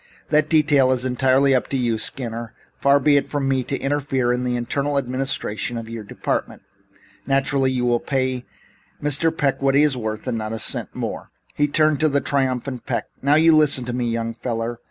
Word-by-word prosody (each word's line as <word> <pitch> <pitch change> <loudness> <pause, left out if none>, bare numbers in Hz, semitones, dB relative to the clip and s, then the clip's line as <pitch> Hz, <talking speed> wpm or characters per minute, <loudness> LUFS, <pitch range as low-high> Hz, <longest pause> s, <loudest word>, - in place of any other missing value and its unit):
"That 155 0 +2
detail 145 -5 +4
is 130 -1 0
entirely 130 +2 +3
up 130 - +1
to 135 - -2
you, 120 -3 0
Skinner. 115 -3 -4 0.3
Far 140 +1 +4
be 145 +1 +4
it 140 - 0
from 145 -2 -2
me 135 -1 +1
to 135 - -2
interfere 135 -3 0
in 125 0 -2
the 125 -1 -1
internal 140 +4 -1
administration 130 -3 -2
of 115 0 -7
your 115 -2 -6
department. 100 - -4 0.6
Naturally 135 -1 +2
you 125 -1 -1
will 120 -1 +2
pay 130 -2 -2 0.5
Mr. 150 +3 +1
Peck 140 -2 0
what 135 0 +2
he 145 - +5
is 150 -3 +2
worth 110 -3 -4
and 115 - -2
not 110 0 -4
a - - -3
cent - - -1
more." - - -5 0.2
He 145 - +1
turned 155 0 +2
to 155 - +3
the 140 0 +1
triumphant 130 -2 -1
Peck. - - -2
"Now, 140 +2 +3
you 160 +1 +5
listen 145 -5 +3
to 120 - -4
me, 120 -1 -1
young 115 0 -2
feller. 115 0 -4
130 Hz, 200 wpm, -21 LUFS, 120-140 Hz, 0.6 s, he